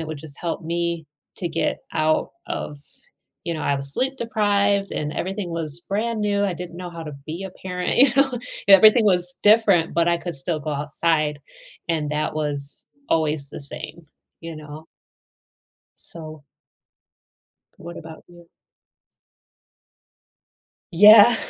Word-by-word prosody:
it 160 - -5
would 155 -1 -6
just 150 -1 -12
help 170 -1 -3
me 170 -1 -2 0.3
to 175 - -3
get - - -1
out 155 -1 +1 0.2
of 145 - -5 0.7
you 170 - -2
know, 155 - -5
I 140 - +1
was 140 0 -5
sleep 265 +1 +1
deprived 205 -3 +1
and 150 0 -3
everything 190 0 -3
was 165 -1 -4
brand 220 +2 -1
new, 205 -1 +1
I 185 -3 -1
didn't 175 0 -8
know 180 -1 -7
how 170 -1 -8
to 155 - -7 0.2
be 165 +5 -5
a 190 - -6
parent, 180 0 -3
you 270 +2 +7
know? 270 -3 +3 0.3
Everything 215 +4 +8
was 180 -3 +1
different, 205 -6 +4
but 170 0 +2
I 170 - +3
could 170 -3 -6
still 150 +3 -3
go 150 - -4
outside, 150 +1 0 0.5
and 155 -3 -1
that 150 0 -1
was 145 -2 -4 0.2
always 155 -3 0
the - - -7
same, 155 +3 -9 0.3
you 165 0 -7
know? 155 +1 -10 1.2
So 155 -3 -9 1.3
what 170 +1 -9
about 160 0 -11
you? 175 -1 -17 2.4
Yeah. 210 +5 +8
170 Hz, 145 wpm, -22 LUFS, 155-195 Hz, 2.4 s, Everything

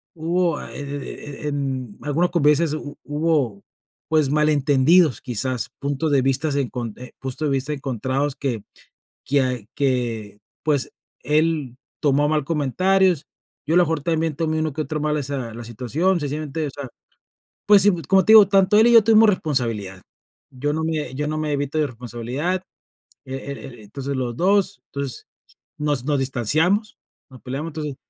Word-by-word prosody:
hubo 170 0 0
e - - -9
e 145 +1 -6
e - - -1
en 135 -6 -3
algunas 160 +5 +1
convivencias 150 -1 +3
hu 145 -2 -6
hubo, 145 -8 0 0.5
pues, 155 -3 +3
malentendidos 150 +1 +3
quizás, 125 0 -1
puntos 145 +2 -1
de 140 - +4
vista 135 +4 +1
enconte 125 -2 -5
puntos 135 +3 -3
de - - 0
vista 135 +2 -1
encontrados 135 +1 -2
que, 125 -7 -3 0.6
quia 130 -5 +1
que, 120 -7 -1 0.2
pues, 145 -4 0 0.3
él 150 -4 +1 0.2
tomó 145 -1 +2
a - - +2
mal 150 -1 +1
comentarios, 170 +3 +2 0.4
yo 155 - 0
a - - +5
lo 180 - +6
mejor 160 -2 -1
también 160 -2 0
tomé 160 -1 -1
uno 155 -2 -1
que 155 - -3
otro 155 0 -3
mal 150 0 0
esa 135 -5 -3
la 120 - -7
situación, 135 - 0
sencillamente, 150 +1 -3
o - - -4
sea, 140 -1 -7 0.8
pues, 205 -1 +7
si 205 - +6
como 190 +5 +3
te 220 - +5
digo, 210 -3 +9
tanto 195 +1 +4
él 225 +2 +6
y 240 - +4
yo 225 -3 +8
tuvimos 225 0 +6
responsabilidad. 115 - -2 0.5
Yo 140 +3 -2
no 160 +1 -2
me 155 -4 -2
yo 150 +2 -2
no 155 0 -2
me 155 -1 -1
evito 145 +1 -1
de 150 - +2
responsabilidad, 125 - -3 0.6
e 130 - -7
e 140 +1 -6
e 120 -4 -9
entonces 135 +6 -5
los 120 -2 -3
dos, 195 +2 +2
entonces 140 -3 -4 0.5
nos, 145 -4 0
nos 145 -1 +1
distanciamos, 155 - +1 0.3
nos 130 - -13
peleamos, 135 +5 -4
entonces, 150 -3 -5
145 Hz, 165 wpm, -22 LUFS, 130-160 Hz, 0.8 s, digo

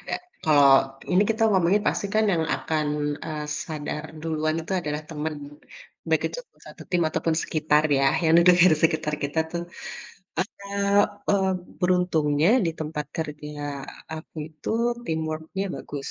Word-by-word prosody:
ada. - - -4 0.3
Kalau 135 -3 +5 0.2
ini 185 +3 +5
kita 225 0 0
ngomongin 190 +3 +3
pasti 200 - -1
kan 220 - +4
yang 165 - +1
akan, 155 -2 -1 0.4
eee, 155 -1 -4 0.2
sadar 150 -1 -5 0.2
duluan 155 -1 -1
itu 165 +4 -6
adalah 150 -1 -3
teman, 155 0 -3 0.7
baik - - +2
itu - - -5 0.3
satu - - -11
tim 175 -1 +2
ataupun 160 +1 0
sekitar 155 -1 +2
ya, 140 - +2 0.2
yang 160 - +4
de - - +5
deger 180 -1 +7
sekitar 155 -2 +1
kita 145 +3 -2
tuh. 170 0 -2 0.8
Eee 200 +1 0 0.3
eee, 195 -2 +3 0.3
beruntungnya 175 -4 +2 0.2
di - - +1
tempat 150 -1 -3
kerja 150 -2 -5 0.3
aku 160 +1 -9
itu 155 -2 -7 0.3
teamwork-nya 160 +2 -3
bagus 140 -1 -6
160 Hz, 140 wpm, -25 LUFS, 150-180 Hz, 0.8 s, deger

